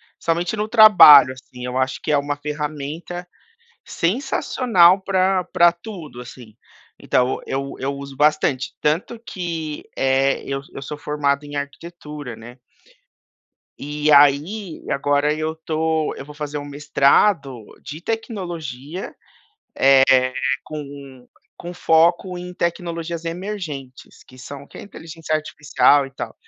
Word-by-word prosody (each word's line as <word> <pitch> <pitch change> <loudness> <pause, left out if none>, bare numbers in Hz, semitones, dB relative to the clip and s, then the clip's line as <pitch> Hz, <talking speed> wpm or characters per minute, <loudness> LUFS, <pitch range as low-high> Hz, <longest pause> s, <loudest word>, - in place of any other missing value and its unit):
principalmente 170 +4 -1
no 210 +1 -2
trabalho, 205 - +8
assim, 125 -1 -11
eu 125 +1 -4
acho 130 0 -1
que - - -2
é 150 - +4
uma 145 +1 -2
ferramenta 150 +4 -6 0.6
sensacional 190 - +2
pra 190 -1 +1
pra 175 0 +4
tudo, 170 - -10
assim. 120 -3 -13 0.4
Então, 125 +1 0
eu 135 +1 -4
eu 135 +2 -2
uso 140 0 -9
bastante, 150 -3 +1
tanto 165 +10 -1
que, 165 -8 -6
eh, 135 +1 +1
eu 135 0 -3
eu - - -8
sou 145 +2 -7
formado 145 -1 -1
em 145 0 -9
arquitetura, 150 -2 -7
né. 120 +3 -13 1.2
E 150 +1 -1
aí, 150 +7 +3
agora 145 +1 +1
eu 155 +1 -3
estou 160 -1 -2
eu - - -8
vou 150 - -12
fazer 150 0 -5
um 145 - -7
mestrado 140 - +1 0.2
de 150 +3 -8
tecnologia, 175 - -5
eh, - - -17 1.5
com 140 -4 -10 0.3
com 175 +1 -8
foco 170 +2 +2
em 180 0 -8
tecnologias 170 -1 -3
emergentes, 165 -7 -7
que 130 - -17
são 140 +3 -9
o - - -19
que - - -14
é - - -9
inteligência 165 -5 -7
artificial 150 -2 +2
e 135 - -12
tal. 135 - -7
150 Hz, 130 wpm, -21 LUFS, 140-175 Hz, 1.5 s, trabalho